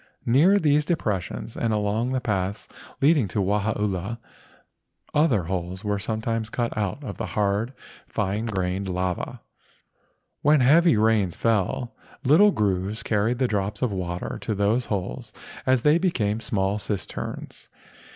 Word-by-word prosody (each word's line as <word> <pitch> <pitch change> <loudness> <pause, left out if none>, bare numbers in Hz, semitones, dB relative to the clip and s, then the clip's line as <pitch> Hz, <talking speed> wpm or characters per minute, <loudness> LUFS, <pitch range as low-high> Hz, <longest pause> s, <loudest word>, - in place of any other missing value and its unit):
Near 155 +12 +5
these 150 -4 +3
depressions 110 - -2
and 115 - 0
along 105 +3 0
the 130 0 0
paths 100 -3 -2 0.3
leading 140 -5 +4
to 95 - -3
Wahaula 105 +1 -1 1.0
other 145 - +3
holes 90 +2 -4
were 105 -1 -1
sometimes 110 +1 -2
cut 120 +1 -2
out 105 +6 -2
of - - -7
the 110 - -2
hard 105 +4 +1 0.3
fine 105 +2 -2
grained 95 -1 -2
lava. 90 -1 -3 1.0
When 150 -1 +4
heavy 160 +3 +5
rains 105 -5 +2
fell, 115 +2 0 0.3
little 160 +10 +6
grooves 100 - -1
carried 110 +3 +1
the 130 0 +2
drops 105 +1 -2
of 125 - +1
water 90 -2 -4
to 110 - -2
these 105 +5 +1
holes 90 - -4 0.3
and 130 0 +5
they 150 +5 +4
became 115 - 0
small 105 -3 -1
cisterns. 100 -1 -5
105 Hz, 135 wpm, -25 LUFS, 100-125 Hz, 1.0 s, little